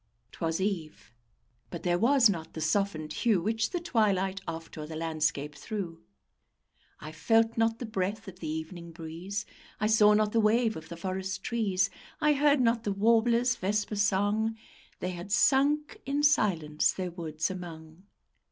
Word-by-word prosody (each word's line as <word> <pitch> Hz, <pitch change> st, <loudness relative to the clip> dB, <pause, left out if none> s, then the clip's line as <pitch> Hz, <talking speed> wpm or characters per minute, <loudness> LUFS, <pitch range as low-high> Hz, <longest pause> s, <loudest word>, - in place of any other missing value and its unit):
'Twas 165 Hz, -1 st, -2 dB
eve; 175 Hz, -, -3 dB, 0.6 s
but 170 Hz, -, -7 dB
there 175 Hz, -1 st, +1 dB
was 250 Hz, +2 st, +5 dB
not 165 Hz, -5 st, -3 dB
the -, -, -6 dB
softened 160 Hz, -2 st, -1 dB
hue 220 Hz, -6 st, +2 dB
Which 220 Hz, +4 st, 0 dB
the 355 Hz, -, -2 dB
twilight 195 Hz, -, +1 dB
oft 165 Hz, 0 st, -6 dB
o'er 155 Hz, -2 st, -6 dB
the 160 Hz, -, -7 dB
landscape 155 Hz, -2 st, -1 dB
threw: 175 Hz, 0 st, -6 dB, 1.0 s
I 155 Hz, -, -8 dB
felt 225 Hz, +8 st, +2 dB
not 225 Hz, 0 st, +1 dB
the 245 Hz, -, -5 dB
breath 215 Hz, +1 st, -3 dB
of 185 Hz, -1 st, -10 dB
the 160 Hz, -, -5 dB
evening 165 Hz, +2 st, -6 dB
breeze; 170 Hz, +5 st, -5 dB, 0.3 s
I -, -, 0 dB
saw 215 Hz, -1 st, +5 dB
not 215 Hz, 0 st, +2 dB
the 230 Hz, -, +2 dB
wave 225 Hz, +1 st, +3 dB
of 160 Hz, -, -9 dB
the 170 Hz, -, -7 dB
forest 190 Hz, +1 st, -4 dB
trees; 195 Hz, -5 st, 0 dB, 0.3 s
I 300 Hz, -2 st, +4 dB
heard 290 Hz, 0 st, +3 dB
not 230 Hz, -2 st, +2 dB
the 205 Hz, -, -1 dB
warbler's 230 Hz, +4 st, +3 dB
vesper 210 Hz, +2 st, -1 dB
song; 205 Hz, +2 st, +1 dB, 0.4 s
They 180 Hz, -, -2 dB
had 175 Hz, +2 st, -8 dB
sunk 295 Hz, -, +2 dB
in 285 Hz, +2 st, -1 dB
silence 170 Hz, -, +2 dB
their 185 Hz, -2 st, -4 dB
woods 160 Hz, -1 st, -3 dB
among. 165 Hz, -2 st, -9 dB
195 Hz, 160 wpm, -29 LUFS, 165-225 Hz, 1.0 s, was